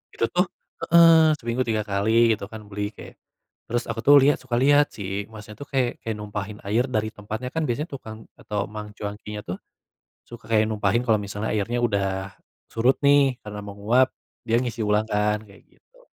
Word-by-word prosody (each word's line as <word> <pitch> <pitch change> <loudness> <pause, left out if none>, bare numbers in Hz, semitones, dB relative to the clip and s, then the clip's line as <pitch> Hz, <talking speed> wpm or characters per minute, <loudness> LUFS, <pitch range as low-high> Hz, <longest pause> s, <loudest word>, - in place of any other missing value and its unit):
Itu - - +1
tuh 180 +1 +2 0.4
heeh, 165 -2 +7
seminggu 120 +2 -1
3 110 -2 0
kali 110 +3 +3
gitu 105 -2 -5
kan 110 +1 -9
beli, 105 +1 -4
kayak. - - -11 0.5
Terus 120 +1 -1
aku 115 0 -3
tuh 145 - +8
lihat 145 +2 +4
suka 130 -2 -3
lihat. 145 +4 +5
Si 100 0 -4
masnya 105 -1 -10
tuh 145 - -8
kayak 130 -3 -1
kayak 110 -1 -3
numpahin 105 0 -6
air 115 +5 +2
dari 110 -4 -1
tempatnya, 110 +5 -6
kan 160 +2 -1
biasanya 145 +7 -2
tukang 110 -5 -8 0.2
atau 105 -1 -3
mang 105 -1 -8
cuankinya 105 0 -6
tuh, 90 0 -5 0.7
suka 120 -2 -12
kayak 110 -1 +4
numpahin 110 +1 +1
kalau 110 - +5
misalnya 105 +1 -4
airnya 110 +4 -1
udah 95 -4 -1 0.4
surut 120 +4 +2
nih 140 -3 +4
karena 105 0 -7
menguap. 105 +6 +2 0.4
Dia 115 +1 +2
ngisi 120 -2 -4
ulang 105 +1 +1
kan, 105 +1 +1
kayak 100 -1 -18
gitu. - - -28
110 Hz, 180 wpm, -24 LUFS, 105-125 Hz, 0.7 s, tuh